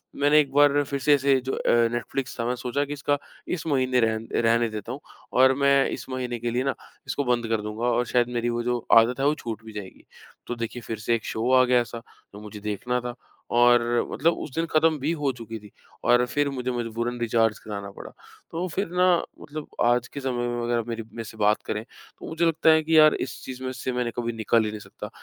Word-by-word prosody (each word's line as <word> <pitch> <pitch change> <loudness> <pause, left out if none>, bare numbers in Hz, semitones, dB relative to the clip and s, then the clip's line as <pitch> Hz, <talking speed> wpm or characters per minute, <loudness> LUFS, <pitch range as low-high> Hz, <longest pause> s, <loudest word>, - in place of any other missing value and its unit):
मैंने 145 +2 +4
एक 140 -3 +1
बार 145 0 +5
फिर 140 0 -4
से 145 +2 +4
ऐसे, 140 -1 +3
जो 130 +1 -4
अ, - - -1 0.2
नेटफ्लिक्स 120 +1 -4
था, 115 - -1
मैं 125 +1 0
सोचा 125 +4 -2
कि 145 - -5
इसका 145 0 0 0.3
इस 165 -2 -3
महीने 130 -3 +2
रहन 110 -1 0
रहने 115 0 +3
देता 110 +1 -6
हूँ, 135 - -5 0.3
और 130 +1 +6
मैं 140 -1 +4
इस - - -6
महीने 125 -2 -3
के 120 0 -2
लिए 125 +2 0
ना, 135 -1 -1 0.3
इसको 140 - -1
बंद 120 -2 0
कर 110 -1 0
दूँगा 105 +3 -4
और 125 0 +2
शायद 120 0 +2
मेरी 120 0 0
वो 120 0 -2
जो 125 0 0 0.2
आदत 115 +3 +4
है, 135 - +1
वो 150 - +2
छूट 115 -6 -6
भी 110 - -10
जाएगी। 100 -3 -9 0.4
तो 120 - -3
देखिए, 115 +1 -5
फिर 110 -1 -5
से 115 +2 +1
एक 115 - -5
शो 115 +3 -1
आ - - +5
गया 125 -1 +4
ऐसा, 120 0 -6 0.3
जो 105 - -9
मुझे 105 0 -9
देखना 105 +4 -2
था 120 0 -5 0.4
और 120 0 +6 0.3
मतलब 165 +3 +2
उस 140 - -7
दिन 165 0 0
खत्म 155 0 +3
भी 150 +5 -1
हो 140 -2 +1
चुकी 115 -2 -8
थी 105 - -14 0.4
और 120 0 +5
फिर 145 +3 0
मुझे 130 -2 -3
मजबूरन 120 0 -3
रिचार्ज 115 -2 +1
कराना 100 -2 -7
पड़ा। - - -10 0.4
तो 175 +3 -2
फिर 190 +3 -2
ना, 180 0 +3 0.4
मतलब 150 0 -7 0.2
आज 120 0 +2
के 140 - -7
समय 120 -2 -1
में 120 0 -2
अगर 120 0 +1
मेरी 115 -1 -4
मेरे 115 +1 -8
से 110 0 -11
बात 105 0 +2
करें, 110 0 -3
तो - - -15
मुझे 165 +1 0
लगता 165 -1 +3
है 160 0 +5
कि 160 +1 +3
यार, 155 -1 +8
इस 125 - -5
चीज़ 130 0 -7
में 130 - -2
से 130 0 -4
मैंने 125 -1 -1
कभी 120 -1 -2
निकल 115 0 +2
ही - - -1
नहीं 110 - -6
सकता। - - -9
120 Hz, 240 wpm, -25 LUFS, 115-140 Hz, 0.4 s, यार